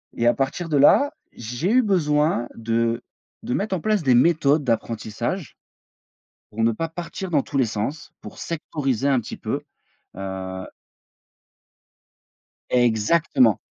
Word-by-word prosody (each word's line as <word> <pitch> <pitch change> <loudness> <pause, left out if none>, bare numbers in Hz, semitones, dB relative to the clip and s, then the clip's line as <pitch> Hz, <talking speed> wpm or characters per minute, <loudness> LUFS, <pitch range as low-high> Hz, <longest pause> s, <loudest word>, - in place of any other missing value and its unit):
et 120 - +1
à 120 - +6
partir 150 +5 -2
de 150 - +2
là, 275 - +6 0.2
j'ai 120 - -3
eu 255 +1 +5
besoin 150 - +1
de 115 +1 0 0.4
de 125 - -3
mettre 200 -1 -1
en 170 - -4
place 215 -5 +1
des 130 -3 +4
méthodes 145 +1 +4
d'apprentissage. 115 - -3 0.9
Pour 115 +2 -2
ne 115 - +3
pas 165 +9 -3
partir 175 +3 -6
dans 145 -5 +3
tous 140 - -3
les 130 - +3
sens, 110 +8 -4
pour - - -10
sectoriser 140 -6 -2
un 135 -3 +3
petit - - -8
peu, - - -3 0.6
heu 95 -1 -5 2.1
Exactement. 120 - +3
135 Hz, 135 wpm, -23 LUFS, 115-165 Hz, 2.1 s, à